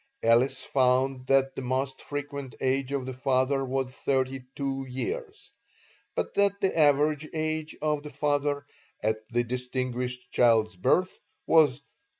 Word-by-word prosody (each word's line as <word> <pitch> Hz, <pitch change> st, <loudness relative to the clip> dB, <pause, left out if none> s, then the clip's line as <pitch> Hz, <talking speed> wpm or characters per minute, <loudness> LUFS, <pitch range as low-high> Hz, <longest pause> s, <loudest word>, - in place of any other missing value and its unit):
Ellis 125 Hz, +3 st, +3 dB
found 130 Hz, 0 st, +1 dB
that 135 Hz, 0 st, +3 dB
the -, -, -4 dB
most 130 Hz, +1 st, -2 dB
frequent 140 Hz, -2 st, -5 dB
age 135 Hz, 0 st, 0 dB
of 140 Hz, -2 st, -1 dB
the 130 Hz, -, -5 dB
father 130 Hz, +1 st, +1 dB
was 130 Hz, 0 st, -2 dB
thirty 130 Hz, 0 st, -1 dB
two 135 Hz, -1 st, -2 dB
years, 430 Hz, -, -5 dB, 0.6 s
but -, -, -2 dB
that 200 Hz, 0 st, +2 dB
the 190 Hz, -, 0 dB
average 150 Hz, 0 st, +3 dB
age 155 Hz, 0 st, -2 dB
of 150 Hz, -1 st, +1 dB
the 150 Hz, -, -8 dB
father 145 Hz, 0 st, 0 dB, 0.4 s
at 110 Hz, 0 st, +1 dB
the 120 Hz, 0 st, +1 dB
distinguished 125 Hz, 0 st, -3 dB
child's 110 Hz, -5 st, +3 dB
birth 180 Hz, -, +1 dB, 0.3 s
was 160 Hz, -2 st, +6 dB
36. -, -, -39 dB
135 Hz, 145 wpm, -27 LUFS, 130-145 Hz, 0.6 s, was